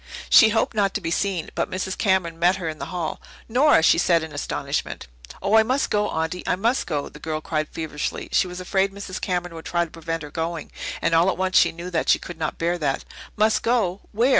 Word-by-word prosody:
She 220 - +8
hoped 225 +2 +1
not 200 -3 +1
to - - +1
be 165 - -3
seen, 190 -3 -1
but - - -1
Mrs. 190 0 -3
Cameron 185 -5 +1
met 175 +2 +4
her 180 -3 -5
in 155 -1 -5
the - - -4
hall. 175 -4 -4 0.3
"Nora!" 255 - +4
she 165 - +5
said 170 -2 +3
in 160 - -7
astonishment. 145 - -3 0.4
"Oh, 200 +2 +3
I - - +8
must 255 +5 0
go, 210 0 +1
Aunty! 160 +3 -2
I - - +2
must 230 +7 0
go!" 150 -4 -2
the 150 - -13
girl 155 0 -3
cried 155 0 -2
feverishly. 155 -2 -4
She - - +3
was 180 0 -7
afraid 190 +2 +1
Mrs. 200 -1 -7
Cameron 175 -2 -2
would 165 -1 -9
try 170 0 0
to 165 - -15
prevent 165 -1 -4
her 145 - -9
going, 165 +1 -4 0.3
and 165 - +2
all 165 +3 +5
at 190 - -1
once 185 0 -1
she - - +6
knew 170 +2 -8
that 165 - 0
she - - +6
could 170 -2 -9
not 155 -1 -2
bear 175 +1 0
that. 140 -4 -1 0.3
"Must 215 +1 +3
go? 210 -6 +1
Where? 235 +5 +2
175 Hz, 240 wpm, -23 LUFS, 165-200 Hz, 0.4 s, She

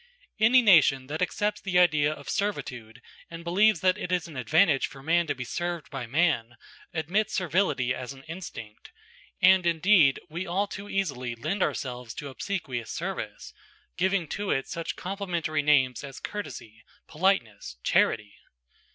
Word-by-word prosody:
Any 240 +4 +6
nation 150 - +5
that 155 +4 -4
accepts 210 +3 -1
the 185 -2 0
idea 155 -4 +4
of 155 - -9
servitude 120 - -3 0.3
and 170 0 -8
believes 185 +1 +3
that 185 -1 +2
it 180 - -4
is 180 -2 0
an 160 - -11
advantage 145 - +3
for 135 -1 -13
man 170 +2 +2
to - - -1
be 125 - -5
served 175 +4 -4
by 130 -4 -5
man, 135 -5 +1 0.4
admits 190 +7 -1
servility 170 -8 +1
as 125 -1 -6
an 135 0 -12
instinct, 160 - -9 0.5
and 185 0 +7
indeed 170 -4 +4
we 175 +3 -5
all 190 +4 0
too 205 0 -8
easily 130 -11 -2
lend 155 - -3
ourselves 125 -7 -3
to 145 - -6
obsequious 135 - -4
service, - - -5 0.4
giving 185 -1 +1
to 205 -1 -3
it 135 - 0
such 165 0 -4
complimentary 175 -5 -2
names 140 -4 +2
as 135 -2 -8
courtesy, 115 - -7 0.2
politeness, 120 - 0
charity. 105 -2 +2
160 Hz, 150 wpm, -27 LUFS, 130-185 Hz, 0.5 s, and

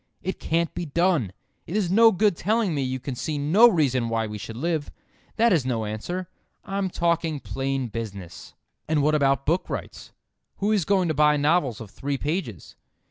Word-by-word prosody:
It 190 - -3
can't 165 0 0
be 175 - -4
done. 165 - +1 0.4
It 170 - -5
is 185 -5 0
no 225 +3 +7
good 205 -1 +2
telling 210 +1 0
me 145 - -1
you 130 0 -2
can 130 +1 -5
see 150 +5 -3
no 180 +12 +6
reason 130 - +1
why 115 -1 0
we 105 -1 -6
should 110 +2 -7
live. 160 +1 -1 0.5
That 230 -1 +4
is 160 -7 +2
no 120 -4 -1
answer. 175 - -4 0.4
I'm 195 -1 -2
talking 170 -3 0
plain 135 -1 -3
business. 100 -6 -8 0.3
And 155 -2 +1
what 155 +1 +3
about 140 -2 +2
book 170 +5 0
rights? - - -6 0.5
Who 205 +2 0
is 205 -6 +2
going 190 -3 +2
to - - +1
buy 150 0 +4
novels 145 -5 +1
of 110 -4 -9
three 140 0 -3
pages? 145 - -4
150 Hz, 190 wpm, -25 LUFS, 130-180 Hz, 0.5 s, no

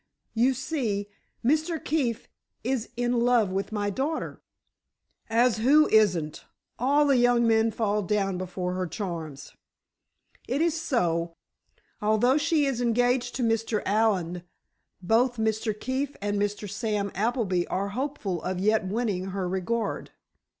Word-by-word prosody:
You 250 +3 +3
see, 235 -7 -2 0.4
Mr. 315 +5 +2
Keefe 255 -8 -1 0.4
is 250 -1 -1
in 245 0 +1
love 235 -4 +3
with 195 +2 -2
my 205 -1 -1
daughter——" 285 +9 -3 0.9
"As 230 +1 +3
who 285 +7 +5
isn't? 180 -8 +2 0.4
All 285 +4 +3
the 275 -2 +4
young 245 -1 +4
men 225 0 +3
fall 210 -1 0
down 195 -2 0
before 180 0 -3
her 185 0 -2
charms!" 160 -7 -6 0.9
"It 265 - -1
is 330 0 +2
so. 175 - -1 0.7
Although 220 +6 +3
she 315 -1 +2
is 265 -3 -1
engaged 245 +1 +1
to 250 - -1
Mr. 225 -1 0
Allen, 195 -5 +1 0.6
both 235 +6 +2
Mr. 220 -1 -1
Keefe 270 +2 -2
and 205 0 -1
Mr. 205 0 -2
Sam 205 -1 -2
Appleby 205 -4 0
are 200 +2 -2
hopeful 215 - -3
of 185 - -3
yet 215 0 +2
winning 205 -3 -1
her 190 -1 -3
regard. 200 +4 -2
220 Hz, 135 wpm, -27 LUFS, 195-250 Hz, 0.9 s, who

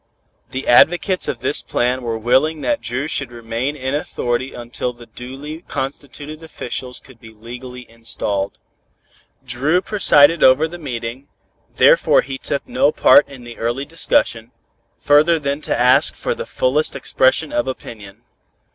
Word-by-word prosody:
The 130 +1 -6
advocates 175 +8 +4
of - - -4
this 145 - +1
plan 125 +2 -1
were 115 -2 -3
willing 140 +7 +1
that 290 - -1
Dru 130 +4 -3
should 140 -5 -3
remain 120 +4 -4
in 130 -1 -4
authority 130 -5 -2
until 120 +1 -5
the 120 0 -14
duly 135 +7 -9
constituted 145 +3 -6
officials 130 -5 -6
could 130 -4 -19
be 115 - -13
legally 125 +3 -10
installed. 110 -4 -3 0.9
Dru 135 +8 +1
presided 165 -6 +4
over 130 +5 +5
the 175 +2 -10
meeting, 125 -2 -6 0.5
therefore - - +5
he 135 0 -7
took 140 - -3
no 145 - +2
part 145 - +5
in 135 -3 -12
the 120 -1 -11
early 120 +4 -2
discussion, 115 -7 0 0.5
further 150 +3 +4
than 140 -1 -3
to - - -2
ask 125 +1 +4
for 485 - -2
the 480 +1 -7
fullest - - 0
expression - - +1
of 300 - 0
opinion. 110 -4 -8
130 Hz, 145 wpm, -19 LUFS, 120-155 Hz, 0.9 s, over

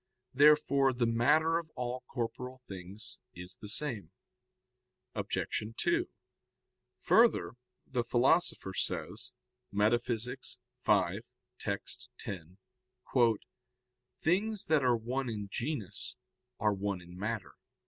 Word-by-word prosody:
Therefore 140 -1 +6
the 120 -1 +1
matter 150 +8 +4
of 165 -2 -9
all 125 0 -3
corporeal 125 +2 -4
things 95 +3 -8 0.2
is 90 +1 -8
the 105 - -7
same. 120 - -1 1.0
Obj. - - -1
2: 345 +1 +2 0.9
Further, 230 +1 +5 0.3
the 125 -2 -1
Philosopher 125 - +3
says - - -2 0.4
(Metaph. 115 +3 +1 0.5
v, - - +3 0.4
text. - - -3
10): 90 -1 -7 1.6
"Things 200 +5 +1
that 155 -3 +3
are 125 -2 +4
one 125 +3 -2
in 105 -3 -4
genus 115 - -3 0.4
are 105 -1 +3
one 100 -1 -2
in 90 0 -12
matter." 105 0 -3
120 Hz, 100 wpm, -32 LUFS, 105-145 Hz, 1.6 s, Therefore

